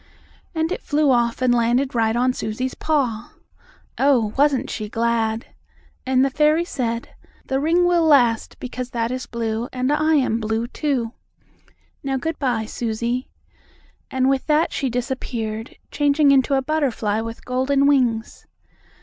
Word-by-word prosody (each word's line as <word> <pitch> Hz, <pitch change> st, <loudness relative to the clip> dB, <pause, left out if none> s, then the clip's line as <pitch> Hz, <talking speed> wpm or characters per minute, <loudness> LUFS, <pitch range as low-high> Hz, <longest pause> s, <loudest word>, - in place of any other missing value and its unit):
And 320 Hz, +1 st, 0 dB
it -, -, -3 dB
flew 295 Hz, -1 st, +2 dB
off 240 Hz, 0 st, +1 dB
and 250 Hz, -1 st, +4 dB
landed 240 Hz, +3 st, +1 dB
right 225 Hz, -1 st, +1 dB
on 250 Hz, +1 st, +2 dB
Susie's 250 Hz, +3 st, -3 dB
paw. 250 Hz, -8 st, -1 dB, 0.7 s
Oh, 245 Hz, -6 st, +3 dB
wasn't 280 Hz, -2 st, +2 dB
she 215 Hz, -2 st, -5 dB
glad! 225 Hz, 0 st, 0 dB, 0.6 s
And 260 Hz, 0 st, +3 dB
the 275 Hz, -, -1 dB
fairy 305 Hz, +4 st, +3 dB
said: 235 Hz, -7 st, -3 dB, 0.4 s
"The 265 Hz, -, -1 dB
ring 335 Hz, +5 st, +2 dB
will 350 Hz, -2 st, +3 dB
last, 245 Hz, -7 st, +3 dB
because 250 Hz, 0 st, -5 dB
that 230 Hz, -1 st, -2 dB
is 255 Hz, 0 st, -4 dB
blue, 230 Hz, 0 st, -3 dB
and 255 Hz, +2 st, -1 dB
I 310 Hz, +1 st, +2 dB
am 255 Hz, -5 st, +1 dB
blue, 220 Hz, +1 st, -1 dB
too. 250 Hz, -3 st, -2 dB, 0.9 s
Now, 270 Hz, -1 st, -1 dB
good 320 Hz, +5 st, -3 dB
bye, 245 Hz, -5 st, 0 dB
Susie." 235 Hz, +3 st, -3 dB, 0.8 s
And 260 Hz, 0 st, +1 dB
with 270 Hz, -1 st, 0 dB
that 310 Hz, +2 st, +2 dB
she 270 Hz, -, -1 dB
disappeared, 235 Hz, -3 st, -4 dB, 0.2 s
changing 290 Hz, 0 st, +3 dB
into 275 Hz, 0 st, +3 dB
a 270 Hz, -, +1 dB
butterfly 255 Hz, -8 st, 0 dB
with 230 Hz, 0 st, -7 dB
golden 265 Hz, +2 st, +1 dB
wings. 245 Hz, -6 st, +1 dB
255 Hz, 150 wpm, -22 LUFS, 230-280 Hz, 0.9 s, and